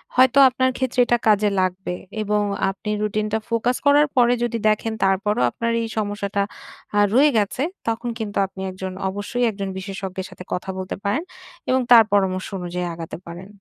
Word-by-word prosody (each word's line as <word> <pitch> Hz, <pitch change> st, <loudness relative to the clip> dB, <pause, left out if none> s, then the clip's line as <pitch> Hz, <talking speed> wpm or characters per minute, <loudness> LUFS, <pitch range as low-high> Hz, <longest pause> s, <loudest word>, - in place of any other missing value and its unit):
হয়তো 255 Hz, +1 st, +5 dB
আপনার 260 Hz, +1 st, +1 dB
ক্ষেত্রে 260 Hz, -1 st, -2 dB
এটা 240 Hz, 0 st, +2 dB
কাজে 210 Hz, -1 st, +4 dB
লাগবে। 185 Hz, 0 st, -2 dB, 0.3 s
এবং 210 Hz, 0 st, +1 dB, 0.3 s
আপনি 195 Hz, +3 st, -6 dB
রুটিনটা 215 Hz, +1 st, -1 dB
ফোকাস 235 Hz, +2 st, +1 dB
করার 290 Hz, +1 st, +5 dB
পরে 245 Hz, -1 st, +5 dB
যদি 235 Hz, -1 st, -1 dB
দেখেন 215 Hz, +1 st, 0 dB
তারপরও 195 Hz, -, +1 dB
আপনার 230 Hz, -, -2 dB
এই 230 Hz, -, -2 dB
সমস্যাটা 205 Hz, -1 st, -1 dB, 0.6 s
আ -, -, +5 dB
রয়ে 280 Hz, +5 st, +6 dB
গেছে 210 Hz, +4 st, 0 dB, 0.3 s
তখন 230 Hz, +1 st, -1 dB
কিন্তু 210 Hz, -2 st, -4 dB
আপনি 190 Hz, 0 st, -10 dB
একজন 185 Hz, 0 st, -6 dB, 0.2 s
অবশ্যই 205 Hz, +5 st, -3 dB
একজন 195 Hz, -1 st, -5 dB
বিশেষজ্ঞের 190 Hz, -1 st, -5 dB
সাথে -, -, -11 dB
কথা 180 Hz, -, -4 dB
বলতে 185 Hz, 0 st, -4 dB
পারেন, 210 Hz, +9 st, 0 dB, 0.5 s
এবং 260 Hz, 0 st, +3 dB
তার 235 Hz, -2 st, +10 dB
পরামর্শ 190 Hz, -2 st, +1 dB
অনুযায়ী 180 Hz, 0 st, -3 dB
আগাতে 165 Hz, -1 st, -7 dB
পারেন। 175 Hz, +3 st, -8 dB
210 Hz, 170 wpm, -22 LUFS, 190-235 Hz, 0.6 s, তার